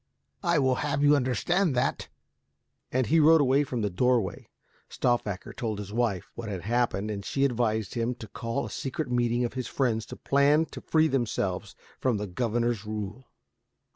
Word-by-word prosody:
I 170 -3 +2
will 130 -3 +2
have 145 -1 0
you 145 0 +6
understand 145 +6 +1
that." 125 - 0 0.8
And 130 0 +1
he 160 +6 +3
rode 145 -3 +5
from 120 -4 -2
the 105 - +1
doorway. 115 -1 0 0.4
Stauffacher 110 -6 -1
told 110 -5 -3
his 105 0 -7
wife 115 -6 -1
what 115 -2 -6
had 95 -3 -4
happened 110 0 0
and 100 -1 -4
she 135 +6 0
advised 110 -5 0
him 120 +1 -1
to 115 -2 -9
call 115 +5 -3
a - - -7
secret 135 0 -4
meeting 120 0 +1
of 120 - -4
his 130 -2 -4
friends 115 -5 0
to - - -8
plan 145 +3 +3
to - - -8
free 160 0 +3
themselves 105 -8 -1 0.2
from 125 -4 +1
the 105 - -3
governor's 115 +2 -1
rule. 105 +3 -5
120 Hz, 170 wpm, -28 LUFS, 110-135 Hz, 0.8 s, you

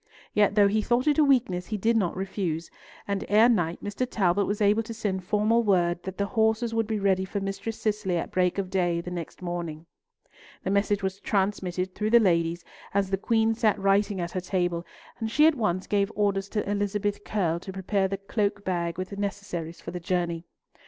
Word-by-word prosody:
Yet 205 -1 +3
though 205 -1 +6
he 215 +2 +1
thought 240 +3 +1
it 300 0 +3
a - - +7
weakness, 235 -11 +2
he 215 - -2
did 225 +4 +2
not 185 -5 +1
refuse, 185 -4 -3 0.4
and 200 -1 -1
ere 215 +3 +6
night 175 -8 +1
Mr. 205 +5 -2
Talbot 195 -2 +1
was 205 +1 -1
able 210 +1 +4
to 225 0 -7
send 195 -4 -2
formal 210 +4 +2
word 175 -5 +2
that 190 0 -7
the 200 - +1
horses 220 +1 +1
would 225 -1 0
be 220 -1 -1
ready 195 -2 +2
for 195 +2 -3
Mistress 195 +3 -4
Cicely 210 -4 0
at - - -3
break 180 0 +1
of 190 -2 -2
day 175 -3 +1
the 180 +1 -6
next 175 +1 -6
morning. 170 -3 -4 0.8
The 190 - -1
message 200 0 +1
was 190 +1 -2
transmitted 190 -3 -1
through 210 +2 -1
the 235 +1 +7
ladies 170 -4 +1 0.3
as 195 -1 +1
the 195 - +2
Queen 225 +2 +2
sat 220 -2 +2
writing 195 0 +2
at 170 -1 -3
her 185 - -2
table, 175 -2 -1 0.3
and 225 -1 -2
she 300 +7 +4
at 320 - +6
once 185 -8 -1
gave 200 0 +1
orders 200 -1 0
to 210 -1 -2
Elizabeth 205 0 -1
Curll 170 -6 0
to 190 - -8
prepare 190 +1 0
the 195 +1 -3
cloak 200 0 -1
bag 170 -2 -1
with 185 +2 -4
necessaries 200 -5 -4
for - - -7
the 180 - -5
journey. 175 -1 -1
200 Hz, 205 wpm, -27 LUFS, 180-210 Hz, 0.8 s, a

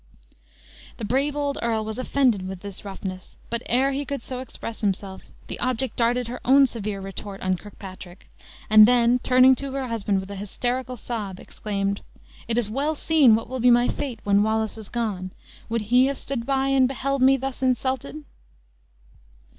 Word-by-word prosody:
The 225 - -4
brave 275 +6 0
old 285 -1 -1
earl 225 -2 0
was 220 +2 -5
offended 250 -8 +1
with 190 -1 -7
this 200 -1 -7
roughness, 190 -2 -7
but 235 0 -1
ere 265 +3 +3
he 275 +1 -2
could 280 -4 -5
so 255 -1 -5
express 230 -3 -7
himself, 195 -2 -2 0.2
the - - -5
object 255 +1 -1
darted 240 +1 +1
her 245 +2 -6
own 275 +2 +6
severe 210 -5 -4
retort 195 +1 -7
on 185 0 +1
Kirkpatrick, 185 -2 -11 0.4
and 215 0 +8
then, 245 0 +4
turning 255 +1 +6
to 275 -1 -4
her 270 -2 -3
husband, 205 -3 0
with 190 +1 -8
an 200 - -6
hysterical 250 +5 -3
sob, 205 -5 -5
exclaimed, 200 -1 -3 0.5
"It 230 0 -1
is 240 -4 +2
well 280 +8 -1
seen 290 -7 +5
what 225 - -3
will 260 +1 -5
be 245 +1 +4
my 240 0 +5
fate 250 -6 -4
when 200 0 +3
Wallace 220 0 0
is 220 -2 -8
gone! 200 -6 -3 0.4
Would 230 0 0
he 250 +5 +4
have 275 0 -2
stood 235 -4 -2
by 270 0 +1
and 265 -1 +4
beheld 275 +1 -2
me 265 +1 +6
thus 270 0 -5
insulted?" 260 +3 -1
235 Hz, 180 wpm, -24 LUFS, 205-260 Hz, 0.5 s, and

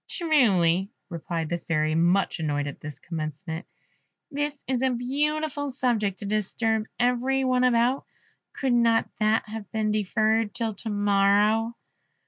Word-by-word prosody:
"Truly," 200 - +2 0.2
replied 165 -2 -4
the 175 - -1
Fairy, 155 -1 0
much 175 +3 +2
annoyed 145 -2 -1
at 140 - -6
this 150 -1 -8
commencement, 160 +1 -6 0.6
"this 290 0 -3
is 255 -2 0
a 265 - +3
beautiful 285 +4 -1
subject 230 -7 0
to 205 - -7
disturb 215 +2 0
every 250 +2 +1
one 255 -1 +2
about; 250 +2 +2 0.5
could 265 -3 -1
not 230 -1 +3
that 215 +1 +2
have 215 -2 -8
been 215 -1 0
deferred 215 +1 +1
till 230 -2 -2
to 220 +3 -7
morrow?" 205 +2 +2
220 Hz, 135 wpm, -26 LUFS, 185-250 Hz, 0.6 s, a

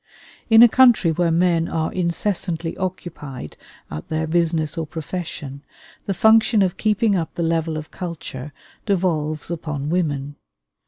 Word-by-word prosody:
In 225 +1 +8
a - - +10
country 235 -8 +5
where 170 +1 +1
men 170 0 +2
are 160 -1 -2
incessantly 170 -2 -1
occupied 165 - -6 0.4
at 75 +1 -6
their 160 0 -1
business 160 -2 0
or 160 -2 -3
profession, 155 -4 -6 0.5
the 195 - 0
function 220 +1 +5
of 185 -1 0
keeping 215 0 +1
up 165 -3 -3
the 170 - -2
level 165 -1 0
of 155 0 -8
culture 150 -6 -7 0.4
devolves 160 -6 -1
upon 150 -3 -4
women. 145 -5 -1
165 Hz, 140 wpm, -21 LUFS, 155-185 Hz, 0.5 s, a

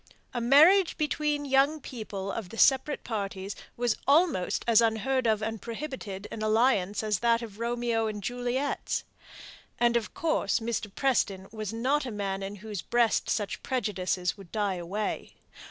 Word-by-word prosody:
A 240 - -2
marriage 320 +10 +6
between 300 -1 0
the 285 - -6
young 275 +4 +3
people 210 -7 -6
of 205 -4 -5
the 225 - -9
separate 270 +4 +3
parties 200 -3 -4 0.2
was 240 -2 +1
almost 290 - +3
as 230 -1 +6
unheard 235 +3 +1
of 215 -1 +2
and 225 -1 -3
prohibited 230 -6 -6
an 220 - -6
alliance 215 -3 +2
as 210 -3 0
that 235 0 +2
of 215 -2 -9
Romeo 235 -1 0
and 210 -2 -5
Juliet's. 245 +4 -2 0.7
And 240 0 +3
of 235 -2 -1
course 310 -11 +1
Mr. 225 -2 -3
Preston 200 -8 +1
was 215 -2 -5
not 265 +5 0
a - - -4
man 195 -2 -3
in 195 +1 -5
whose 210 -5 -4
breast 235 -2 +1
such 205 -3 -1
prejudices 190 -7 -1
would 195 -5 -14
die 205 -3 0
away. 190 +5 -4
225 Hz, 160 wpm, -28 LUFS, 205-260 Hz, 0.7 s, marriage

